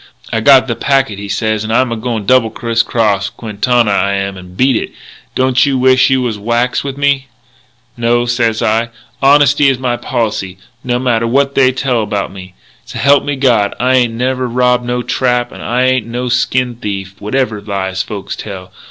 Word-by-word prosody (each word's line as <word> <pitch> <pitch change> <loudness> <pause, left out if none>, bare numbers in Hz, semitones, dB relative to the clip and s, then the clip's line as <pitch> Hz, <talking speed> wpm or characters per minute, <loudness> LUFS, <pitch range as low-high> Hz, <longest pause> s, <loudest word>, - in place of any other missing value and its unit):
"'I 115 - +1
got 135 +3 +6
the 115 - -2
packet,' 135 -4 0
he 100 0 -7
sez, 110 0 -1
'and 110 - -4
I'm 120 +1 +2
a - - -1
going 115 -1 -3
to - - -15
double 130 -3 +4
criss 115 +1 -1
cross 105 -4 0
Quintana, 115 +1 0
I 100 0 +1
am, 100 0 -2
and 90 0 -12
beat 130 0 +3
it. - - -2 0.4
Don't 130 0 +2
you 140 -2 +1
wish 130 0 +4
you 130 -1 +2
was 110 -4 -3
whacks 120 +4 0
with 140 -1 -5
me?' 140 -1 +1 0.7
"'No,' 120 0 +1
sez 120 -2 0
I, 115 +2 +1 0.3
'honesty 145 0 +4
is 135 - +1
my 125 -2 -1
policy, 105 -7 -3 0.3
no 125 -2 0
matter 120 -2 0
what 140 +3 +1
they 130 -2 +4
tell 130 -2 -1
about 105 -2 -3
me. 95 -1 -11 0.3
S'help 140 0 +2
me 145 - -2
God, 120 -7 +1
I 125 +1 +2
ain't 120 -3 +2
never 130 +1 -1
robbed 125 0 +1
no 125 0 -2
trap 125 -1 0
and - - -10
I 125 +2 0
ain't 130 -3 +1
no 125 +2 -3
skin 125 0 0
thief, 100 -3 -5
whatever 110 -1 -2
lies 95 -2 -3
folks 100 -1 -6
tell. 95 -3 -8
120 Hz, 195 wpm, -14 LUFS, 105-130 Hz, 0.7 s, got